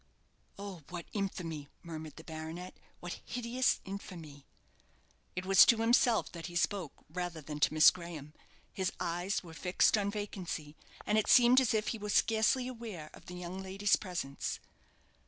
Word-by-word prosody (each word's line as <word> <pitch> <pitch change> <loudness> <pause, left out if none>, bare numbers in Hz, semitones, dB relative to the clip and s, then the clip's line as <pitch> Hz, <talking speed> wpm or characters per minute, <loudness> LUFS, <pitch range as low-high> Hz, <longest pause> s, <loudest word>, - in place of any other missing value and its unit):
"Oh, 200 -4 -7
what 175 -1 -6
infamy!" 170 -7 -3 0.2
murmured 160 -3 -7
the 160 - -11
baronet; 160 +3 -7 0.3
"what 175 0 -6
hideous 250 +2 0
infamy!" 165 -7 -8 0.9
It 180 0 -3
was 195 0 +8
to 235 - +6
himself 230 0 +3
that 170 -1 -7
he 175 - -9
spoke 175 -2 -1
rather 175 0 -4
than 150 0 -6
to 150 - +3
Miss 155 - +9
Graham. 170 -5 -8 0.4
His 190 -1 -1
eyes 175 +4 -1
were 165 -2 -11
fixed 180 +5 +3
on 200 0 0
vacancy, 185 -7 -5 0.3
and 215 +1 +3
it 215 - -1
seemed 250 +1 +7
as 235 -3 +2
if 215 0 +1
he 225 - -3
were 210 0 -5
scarcely 225 +4 +3
aware 225 -11 -7
of - - -15
the 180 - -7
young 180 +1 -6
lady's 195 +2 +2
presence. 175 -8 -4
180 Hz, 160 wpm, -33 LUFS, 165-210 Hz, 0.9 s, Miss